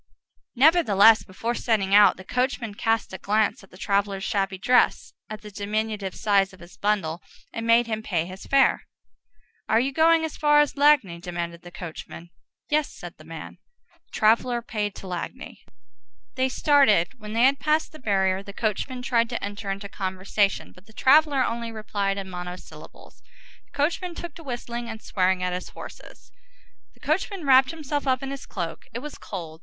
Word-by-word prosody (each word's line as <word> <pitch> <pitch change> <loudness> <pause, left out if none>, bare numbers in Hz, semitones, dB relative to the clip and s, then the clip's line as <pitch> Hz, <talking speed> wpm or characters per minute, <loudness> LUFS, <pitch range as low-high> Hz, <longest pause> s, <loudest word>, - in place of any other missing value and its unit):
Nevertheless, 235 - +6
before 225 +5 -4
setting 210 -5 0
out, 205 0 +7
the 185 - -10
coachman 250 0 -2
cast 225 -1 -1
a 190 - -6
glance 210 0 0
at 195 - -17
the 185 - -16
traveller's 200 0 -1
shabby 195 -3 -1
dress, 250 +6 +2 0.2
at 215 0 -7
the 210 - -11
diminutive 210 -1 -3
size 195 -2 +2
of 190 - -15
his 175 +1 -14
bundle, 185 -4 -1 0.3
and 230 0 -4
made 230 +1 +5
him 220 -1 -3
pay 175 -6 -1
his 185 +2 -10
fare. 275 -1 +3 0.8
"Are 220 - +4
you 265 +3 0
going 320 +2 +4
as 320 - -6
far 295 -1 +4
as 295 -1 +2
Lagny?" 280 - +3
demanded 170 -1 -5
the 175 - -11
coachman. 170 -1 -9 0.4
"Yes," 300 0 0
said - - -11
the - - -13
man. - - -9 0.5
The - - -40
traveller 235 +2 +2
paid 210 -3 -3
to 195 - -9
Lagny. 185 +9 -6 0.7
They 260 0 0
started. 255 - +3
When 210 -1 -8
they 230 +2 +2
had 270 +2 +4
passed 310 +1 +1
the 310 - -13
barrier, 190 -4 +1
the 200 0 -10
coachman 240 +4 -3
tried 235 -2 +1
to 235 - -4
enter 205 0 -5
into 200 +1 -4
conversation, 195 +1 -1
but 185 +3 -20
the 220 - -18
traveller 285 +2 +4
only 230 0 -3
replied 200 -2 -2
in 195 -1 -5
monosyllables. 180 0 -10 0.4
The - - -18
coachman 340 +4 -1
took 345 -2 -7
to 330 - -12
whistling 240 -3 -5
and 220 -1 -6
swearing 185 -3 0
at 180 0 -1
his 180 - -5
horses. - - -12 0.6
The - - -25
coachman 355 +2 -2
wrapped 265 -1 +6
himself 295 -3 -4
up 255 0 +1
in 270 - -4
his 275 - -7
cloak. 170 -5 -6
It - - -2
was 300 - -8
cold. 165 -5 -7
215 Hz, 180 wpm, -25 LUFS, 195-260 Hz, 0.8 s, out